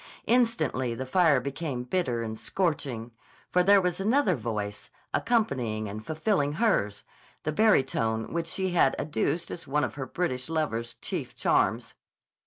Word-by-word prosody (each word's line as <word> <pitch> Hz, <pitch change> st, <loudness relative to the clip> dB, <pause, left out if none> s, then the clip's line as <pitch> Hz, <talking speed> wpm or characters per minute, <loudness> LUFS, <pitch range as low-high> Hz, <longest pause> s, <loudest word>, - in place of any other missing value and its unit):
Instantly 160 Hz, -, +1 dB
the 130 Hz, -, -4 dB
fire 155 Hz, -1 st, +4 dB
became 140 Hz, -1 st, -4 dB
bitter 125 Hz, -5 st, -1 dB
and 110 Hz, -1 st, -4 dB
scorching. 135 Hz, -, -2 dB, 0.4 s
For 180 Hz, -, +4 dB
there 200 Hz, +2 st, +6 dB
was 180 Hz, -1 st, -1 dB
another 220 Hz, +1 st, +3 dB
voice, 105 Hz, -6 st, -4 dB, 0.2 s
accompanying 125 Hz, -, 0 dB
and 105 Hz, +2 st, -6 dB
fulfilling 155 Hz, -, 0 dB
hers, 150 Hz, -, +1 dB, 0.4 s
the 155 Hz, -, -1 dB
barytone 130 Hz, -, +2 dB
which 165 Hz, -1 st, -1 dB
she 190 Hz, +2 st, -1 dB
had 165 Hz, -6 st, +3 dB
adduced 155 Hz, +2 st, -1 dB
as 165 Hz, -, -5 dB
one 145 Hz, +2 st, +1 dB
of -, -, -2 dB
her 135 Hz, -2 st, -5 dB
British 130 Hz, -6 st, -2 dB
lover's 120 Hz, -8 st, -2 dB
chief -, -, -4 dB
charms. -, -, +1 dB
145 Hz, 145 wpm, -28 LUFS, 120-180 Hz, 0.4 s, there